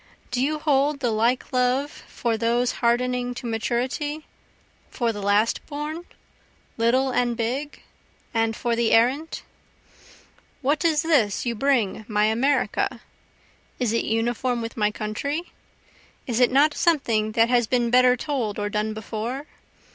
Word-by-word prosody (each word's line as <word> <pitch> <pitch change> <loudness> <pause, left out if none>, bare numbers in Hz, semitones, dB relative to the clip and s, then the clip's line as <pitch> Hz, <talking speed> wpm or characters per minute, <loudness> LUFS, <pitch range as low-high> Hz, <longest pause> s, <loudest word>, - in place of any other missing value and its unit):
Do 245 0 0
you 305 +3 0
hold 290 -1 +1
the 245 -4 0
like 235 +5 0
love 255 +3 +1
for 235 -2 -3
those 235 +2 +1
hardening 245 +1 +1
to 245 - -7
maturity? 250 +7 -2 0.6
for 235 -2 -1
the 205 - -6
last 205 +3 +2
born? 305 +3 -5 0.7
little 255 +3 +2
and 240 -1 0
big? 260 +6 -3 0.5
and 225 -1 +1
for 235 +1 -1
the 230 -1 +1
errant? 260 +8 +2 1.2
What 295 +5 +1
is 320 -2 +2
this 255 - +2
you 240 - 0
bring 230 -4 0
my 210 -1 +2
America? 250 +4 0 0.8
Is 240 -4 0
it 230 - +1
uniform 240 +2 0
with 230 +1 -5
my 210 -3 +2
country? 280 +11 -4 0.7
Is 240 -3 -1
it 250 -1 +4
not 290 +3 +4
something 230 -12 +1
that 230 +1 +3
has 240 -2 +3
been 240 -1 +1
better 250 0 +5
told 245 -7 -2
or 205 0 -2
done 215 +1 -2
before? 225 +6 -5
245 Hz, 140 wpm, -24 LUFS, 225-275 Hz, 1.2 s, better